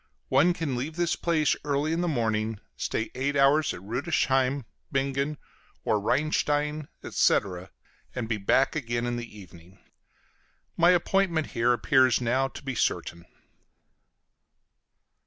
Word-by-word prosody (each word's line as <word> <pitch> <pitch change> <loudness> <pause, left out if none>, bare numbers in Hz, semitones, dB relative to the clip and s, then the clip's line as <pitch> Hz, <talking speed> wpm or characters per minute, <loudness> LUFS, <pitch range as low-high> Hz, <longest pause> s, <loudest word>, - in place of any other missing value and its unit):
One 175 0 +4
can 160 -7 -2
leave 140 +6 -4
this 175 0 0
place 160 -4 +1
early 145 +2 0
in 170 - 0
the 175 - 0
morning, 110 -6 -1 0.2
stay 110 - -3
eight 140 +3 -1
hours 140 +2 +4
at 90 - -8
Rüdesheim, 130 - 0 0.3
Bingen, 140 +1 -1 0.5
or 105 - +2
Rheinstein, 150 +4 0 0.2
etc., 95 -2 +1 0.5
and 120 -3 -3
be 110 -1 -1
back 105 +9 +2
again 120 -5 -2
in 120 0 -1
the 115 -3 -8
evening. 90 0 -15 1.0
My 170 +1 +5
appointment 180 -2 +2
here 120 +1 +2
appears 130 +1 +3
now 130 +2 +1
to 135 - -11
be 135 -1 -3
certain. 85 -7 -2
135 Hz, 130 wpm, -27 LUFS, 115-150 Hz, 1.0 s, My